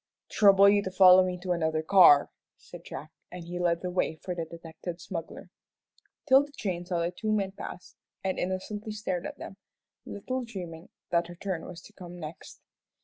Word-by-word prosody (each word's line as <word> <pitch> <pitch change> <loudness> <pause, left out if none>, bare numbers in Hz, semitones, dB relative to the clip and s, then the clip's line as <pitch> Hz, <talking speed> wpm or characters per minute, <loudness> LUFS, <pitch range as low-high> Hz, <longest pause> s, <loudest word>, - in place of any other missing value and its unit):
"Trouble 200 -1 +6
you 205 0 +5
to 190 - -4
follow 185 0 +7
me 180 -1 -2
to 185 - -2
another 160 -2 0
car," 165 -5 +6 0.3
said - - -13
Jack, - - -9 0.2
and 180 -1 -8
he 175 +1 -6
led 170 -1 +1
the 180 - -3
way 180 -3 0
for 180 +3 -6
the 170 -2 -4
detected 165 +1 -9
smuggler. 165 -1 -7 0.7
'Tilda 285 +1 +4
Jane 180 -4 -3
saw 175 -2 -1
the 170 +1 -1
two 215 +4 -3
men 200 -3 0
pass, 185 -2 -9 0.3
and 190 -1 -2
innocently 205 +4 -4
stared 190 -4 -3
at - - -9
them, 195 - -9 0.5
little 255 +5 -4
dreaming 180 -7 -8 0.2
that 170 -1 +1
her 175 - -10
turn 180 -2 -4
was 175 -2 -10
to 210 - -16
come 180 -3 -10
next. 155 0 -10
180 Hz, 185 wpm, -28 LUFS, 170-200 Hz, 0.7 s, follow